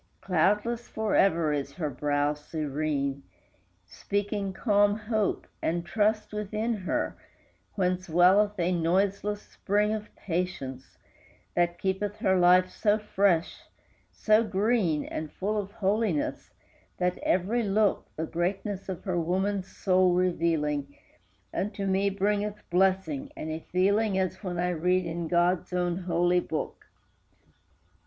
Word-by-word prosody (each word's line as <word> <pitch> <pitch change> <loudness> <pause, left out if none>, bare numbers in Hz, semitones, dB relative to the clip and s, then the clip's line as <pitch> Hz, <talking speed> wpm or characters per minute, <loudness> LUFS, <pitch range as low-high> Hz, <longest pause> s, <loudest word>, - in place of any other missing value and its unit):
Cloudless 210 +7 +1
forever 180 -7 +2
is 140 -1 -3
her 150 -3 -3
brow 145 +2 0
serene, 145 -2 -2 0.6
Speaking 205 -1 -2
calm 205 0 +2
hope 215 -1 -1 0.2
and 170 +1 -1
trust 215 +1 0
within 210 +2 -2
her, 190 -4 -2 0.6
whence 185 -2 -1
Welleth 190 +5 +4
a 175 +1 +1
noiseless 195 +4 0
spring 210 +2 0
of 215 -1 -5
patience, 165 -8 -4 0.6
That 175 0 +1
keepeth 195 +2 -1
all 200 - 0
her 190 - +3
life 180 +1 +6
so 210 -1 +2
fresh, 195 -5 +1 0.6
so 215 +1 +3
green 200 -6 +1
And 155 -1 -5
full 205 +3 -2
of 200 -2 -3
holiness, 205 -5 -1 0.5
that 180 0 0
every 200 +7 +1
look, 210 -1 +1
The 160 - -2
greatness 190 +4 -3
of 185 - -5
her 185 -4 -1
woman's 190 +3 -1
soul 185 -2 +2
revealing, 160 -5 0 0.6
Unto 200 0 -2
me 195 +1 +2
bringeth 205 +1 -1
blessing, 190 +10 +1
and 155 - -4
a 160 - -3
feeling 200 +3 +2
As 185 0 -1
when 180 -2 -3
I 180 +1 0
read 180 +2 +1
in 170 0 -3
God's 175 +1 +1
own 175 -1 0
holy 175 0 +1
book. 160 -3 -5
185 Hz, 125 wpm, -28 LUFS, 170-205 Hz, 0.6 s, life